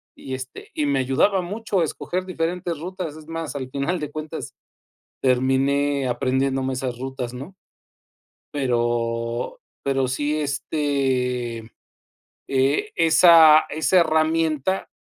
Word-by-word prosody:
y, 130 - -8
este, 130 0 -9
y 150 - 0
me 140 -1 +1
ayudaba 140 +9 +2
mucho 205 +1 -2
a - - +4
escoger 180 +3 -3
diferentes 170 -2 -3
rutas, 180 -2 -5
es 155 -1 -13
más, 165 -2 -5
al 130 -2 -4
final 140 +7 -2
de 150 -1 -5
cuentas 155 -3 -6 0.7
terminé 135 +2 +2
aprendiéndome 130 +1 0
esas 125 -2 -3
rutas, 130 -2 -5
¿no? 140 +10 -9 1.0
Pero 120 - -1 0.2
pero 135 -1 +1
sí, 145 +4 -1
este, 135 -5 -1
mm, 110 - -13 0.8
eh, 135 +1 +1
esa 160 -1 +7
esa 160 +4 +3
herramienta 160 +1 +1
140 Hz, 120 wpm, -23 LUFS, 130-160 Hz, 1.0 s, esa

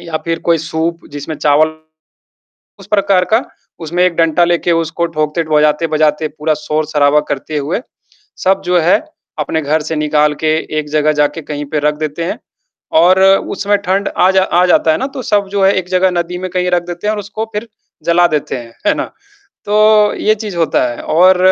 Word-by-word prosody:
या 165 -2 -4
फिर 165 0 -1
कोई 165 -1 +4
सूप 165 +2 -3
जिसमें 145 +2 -6
चावल 150 +2 +2 1.0
उस - - -14
प्रकार 200 -3 +2
का, 230 +4 +3 0.4
उसमें 175 +2 -1
एक 180 -2 0
डंटा 165 +1 +2
लेके 175 0 0
उसको 165 +1 -1
ठोकते 155 +2 0
बजाते-बजाते 150 0 +2
पूरा 155 +1 -1
शोर-शराबा 150 -1 +2
करते 150 +2 -3
हुए, 150 +9 -2 0.6
सब 190 +1 +1
जो 180 0 +2
है 170 +2 +3 0.4
अपने 155 +2 -1
घर 155 +2 0
से 160 +1 -4
निकाल 150 0 +2
के 155 0 +3 0.2
एक 150 -1 -6
जगह 155 0 +2
जाके 150 +3 0
कहीं 145 -1 -5
पे 150 - +1
रख 150 +1 0
देते 155 +1 -4
हैं। 210 +7 -4 0.6
और 185 +2 +4
उसमें 195 +1 +2
ठंड 195 +1 0
आ 185 - +4
जा 190 0 +3
आ 180 -1 +2
जाता 165 -2 +3
है - - +1
ना, 265 - -2
तो 270 -1 -7
सब 205 -2 +1
जो 200 -1 0
है 195 - +4
एक 185 - -2
जगह 185 0 +2
नदी 175 0 -2
में 185 0 -4
कहीं 180 -1 0
रख 175 -1 +1
देते 175 +3 -5
हैं 215 - +1
और 210 - -4
उसको 210 +2 -5
फिर 210 +3 -4 0.4
जला 175 +1 +4
देते 150 -4 -2
हैं, 115 -1 -11
है - - +4
ना? - - -2 0.6
तो, 210 0 +4
ये 215 - +2
चीज़ 210 -4 -6
होता 165 -1 +1
है 120 - -8
और 185 +3 +4
170 Hz, 200 wpm, -15 LUFS, 155-190 Hz, 1.0 s, कोई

